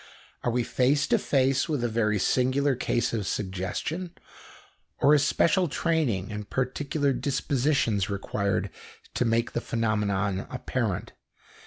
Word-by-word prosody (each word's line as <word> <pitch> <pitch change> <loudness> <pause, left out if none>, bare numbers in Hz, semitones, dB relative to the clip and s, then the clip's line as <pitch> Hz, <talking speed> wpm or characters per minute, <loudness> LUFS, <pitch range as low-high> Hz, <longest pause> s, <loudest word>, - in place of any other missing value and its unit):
Are - - +1
we 120 +1 +1
face 140 +5 +2
to - - +4
face 135 +2 +1
with 145 -6 -1
a - - +2
very 110 -2 +1
singular 130 +7 +2
case 120 -2 -1
of 105 -4 -2
suggestion, 105 - -3 0.8
or 145 +3 +5
is 145 -2 +4
special 180 +1 +3
training 135 - 0
and 105 -1 -6
particular 140 +2 0
dispositions 130 - 0
required 100 0 -1 0.4
to 125 - 0
make 115 +1 +1
the 120 - -2
phenomenon 105 -4 -1
apparent? 120 -6 -2
120 Hz, 130 wpm, -27 LUFS, 105-140 Hz, 0.8 s, or